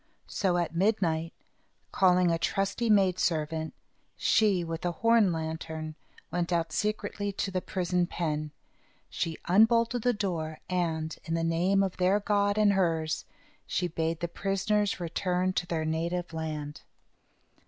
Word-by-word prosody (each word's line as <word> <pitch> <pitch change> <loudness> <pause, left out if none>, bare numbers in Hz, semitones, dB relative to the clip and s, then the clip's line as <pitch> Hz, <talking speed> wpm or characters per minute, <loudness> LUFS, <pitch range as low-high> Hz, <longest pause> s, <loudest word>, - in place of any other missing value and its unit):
So, 185 -3 0
at 170 -2 -1
midnight, 170 -4 +1 0.6
calling 180 -2 +4
a 165 - 0
trusty 195 +6 0
maid 195 -4 +4
servant, 160 -1 -1 0.4
she, 200 -5 +3
with 165 -1 -5
a 175 -1 0
horn 230 -2 +4
lantern, 160 -1 -4 0.4
went 175 0 -1
out 165 -2 0
secretly 205 0 -2
to 195 - -2
the 185 -1 -1
prison 180 -1 0
pen. 155 -3 -2 0.6
She 165 -1 -2
unbolted 230 +5 +4
the 245 - +3
door, 170 -8 -3
and, 165 -3 -1
in 165 - -1
the 165 - 0
name 180 +4 +2
of 190 -2 -3
their 185 +3 +3
God 205 0 +1
and 210 -1 +4
hers, 165 -4 0 0.4
she 180 - 0
bade 165 0 -2
the 170 - 0
prisoners 195 +3 0
return 180 +2 -1
to 175 - -1
their 160 -2 -1
native 170 +2 -2
land. 150 -2 -5
175 Hz, 145 wpm, -29 LUFS, 165-195 Hz, 0.6 s, calling